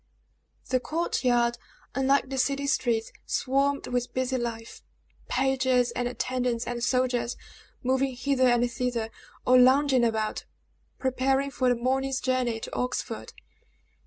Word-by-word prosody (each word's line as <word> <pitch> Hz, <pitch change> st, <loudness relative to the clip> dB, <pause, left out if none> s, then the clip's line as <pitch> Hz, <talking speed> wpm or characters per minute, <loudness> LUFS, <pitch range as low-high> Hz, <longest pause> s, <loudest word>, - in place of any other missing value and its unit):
The 255 Hz, -, +2 dB
court 325 Hz, +6 st, -2 dB
yard, 240 Hz, -1 st, +2 dB, 0.3 s
unlike 270 Hz, +1 st, +2 dB
the 265 Hz, -, -1 dB
city 280 Hz, +2 st, 0 dB
streets, 240 Hz, -6 st, 0 dB, 0.2 s
swarmed 275 Hz, +2 st, +1 dB
with 245 Hz, 0 st, -2 dB
busy 260 Hz, 0 st, 0 dB
life. 230 Hz, -1 st, -5 dB, 0.5 s
Pages, 260 Hz, -2 st, +2 dB
and 245 Hz, +1 st, -2 dB
attendants, 250 Hz, -1 st, -1 dB
and 240 Hz, -1 st, -4 dB
soldiers, 245 Hz, -1 st, 0 dB, 0.5 s
moving 260 Hz, +1 st, +1 dB
hither 260 Hz, 0 st, +2 dB
and 240 Hz, -1 st, +3 dB
thither, 240 Hz, -2 st, -2 dB, 0.3 s
or 255 Hz, 0 st, +6 dB
lounging 260 Hz, 0 st, +5 dB
about, 220 Hz, -2 st, -1 dB, 0.5 s
preparing 265 Hz, +1 st, 0 dB
for 255 Hz, -2 st, +1 dB
the 245 Hz, -, +3 dB
morning's 265 Hz, +2 st, 0 dB
journey 255 Hz, -3 st, 0 dB
to -, -, -7 dB
Oxford. 250 Hz, 0 st, -3 dB
255 Hz, 130 wpm, -27 LUFS, 240-265 Hz, 0.5 s, or